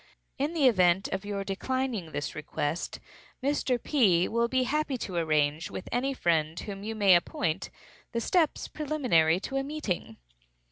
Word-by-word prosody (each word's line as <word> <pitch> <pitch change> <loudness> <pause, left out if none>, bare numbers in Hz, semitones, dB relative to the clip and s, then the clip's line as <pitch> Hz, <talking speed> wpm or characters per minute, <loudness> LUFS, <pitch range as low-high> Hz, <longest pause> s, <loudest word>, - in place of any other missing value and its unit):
In 290 +4 0
the 300 -4 +3
event 185 -4 +3
of 195 - -3
your 200 -1 -3
declining 220 -2 -2
this 145 - -3
request, 155 +1 -3 0.4
Mr. 275 -2 +1
P. 195 - +3
will 235 +1 +1
be 260 +1 +1
happy 290 0 0
to 190 -6 -5
arrange, 155 -1 +1
with - - -7
any 255 +3 0
friend 165 - 0
whom 195 -2 -6
you 220 +2 -4
may 200 -3 +5
appoint, 175 0 0 0.4
the 235 - -1
steps 325 +5 +1
preliminary 250 - +2
to 270 - -3
a 270 - 0
meeting. 220 - -4
205 Hz, 155 wpm, -28 LUFS, 170-265 Hz, 0.4 s, may